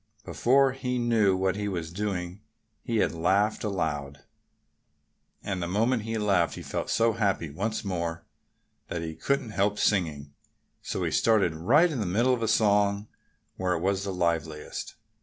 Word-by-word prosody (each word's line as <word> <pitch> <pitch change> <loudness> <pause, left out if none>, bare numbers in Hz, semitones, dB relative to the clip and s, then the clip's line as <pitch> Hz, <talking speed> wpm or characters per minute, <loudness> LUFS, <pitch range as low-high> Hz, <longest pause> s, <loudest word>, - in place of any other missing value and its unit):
Before 135 +2 +3
he 125 -1 -3
knew 110 -5 +2
what 95 0 0
he 105 0 -3
was 85 -4 -4
doing 95 -1 -3 0.4
he 115 -3 -2
had - - +2
laughed 100 +7 +1
aloud. 75 -8 -3 1.2
And 95 -3 -3
the 85 - -2
moment 115 +6 +1
he 115 +1 -3
laughed 100 -5 +1
he - - -8
felt - - -4
so 115 0 +3
happy 100 -8 0
once 110 +8 -3
more 85 -3 -3 0.6
that 85 -1 -4
he 80 -1 -4
couldn't 125 +7 -1
help 105 0 +1
singing. 75 -10 0 0.5
So - - -3
he - - -1
started 105 -7 +3
right 145 - +4
in 140 - -3
the 105 - -1
middle 120 +8 +2
of 120 - -2
a 115 - 0
song, 105 -1 +2 0.5
where 90 -1 0
it 85 - -2
was 95 +1 0
the 100 - -3
liveliest. 80 -4 -2
100 Hz, 165 wpm, -27 LUFS, 85-110 Hz, 1.2 s, right